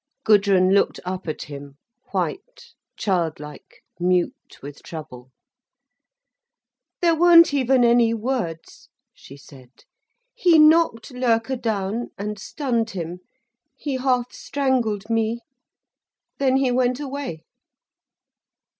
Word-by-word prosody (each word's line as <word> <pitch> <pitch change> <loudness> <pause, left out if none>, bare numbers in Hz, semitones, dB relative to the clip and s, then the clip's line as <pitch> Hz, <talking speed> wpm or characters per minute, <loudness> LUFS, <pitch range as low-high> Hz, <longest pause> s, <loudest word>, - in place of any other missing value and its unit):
Gudrun 195 -3 +4
looked 200 - +2
up 185 0 -5
at 155 - -4
him, 140 -1 -10 0.3
white, 475 +4 -5 0.2
childlike, 160 -6 -4 0.2
mute 180 0 -1
with 145 0 -10
trouble. 130 -6 -10 1.7
"There 340 -2 +4
weren't 335 -1 +6
even 260 -2 +2
any 235 -1 +4
words," 225 -8 -4 0.2
she 140 - -14
said. 130 -3 -17 0.5
"He 345 -3 +4
knocked 305 -6 +4
Loerke 245 0 0
down 220 +1 -2
and 210 +1 -5
stunned 240 -6 -2
him, 175 -3 -6 0.6
he 280 -3 -3
half 250 -1 0
strangled 245 -7 -1
me, 225 +1 0 1.0
then 265 -1 +2
he 265 -2 +1
went 250 +1 +1
away." 275 - -6
230 Hz, 100 wpm, -22 LUFS, 180-265 Hz, 1.7 s, weren't